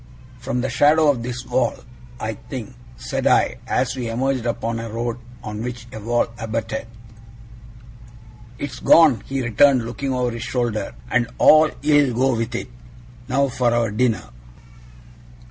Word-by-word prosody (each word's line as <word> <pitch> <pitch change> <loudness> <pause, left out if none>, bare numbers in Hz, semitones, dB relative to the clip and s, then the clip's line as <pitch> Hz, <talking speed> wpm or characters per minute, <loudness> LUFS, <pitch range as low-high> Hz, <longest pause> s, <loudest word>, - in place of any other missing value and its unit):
'From 125 - -2
the 130 - -2
shadow 150 +3 +5
of 125 -4 -4
this 125 +1 -5
wall, - - 0 0.4
I - - -3
think,' - - -8 0.2
said - - -2
I, - - +3
as 125 0 0
we 125 -3 -4
emerged 125 +1 -1
upon 115 0 -2
a 115 0 -5
road 115 +2 -3 0.2
on 105 0 -5
which 120 -1 -5
a 110 - -6
wall 120 +3 +1
abutted. 115 +1 -3 1.7
'It's 135 -3 -6
gone!' 150 -10 +6
he 135 -1 -2
returned, 125 +1 +4
looking 125 +4 -4
over 125 -1 0
his 115 -1 -6
shoulder. 115 - -2 0.2
'And 120 -1 +2
all 155 0 +6
ill 145 -4 +3
go 130 +1 +2
with 115 +1 -3
it. 125 - -4 0.6
Now 140 +2 +2
for 120 -1 +1
our 115 -2 +1
dinner! 115 +1 +1
120 Hz, 150 wpm, -21 LUFS, 115-130 Hz, 1.7 s, gone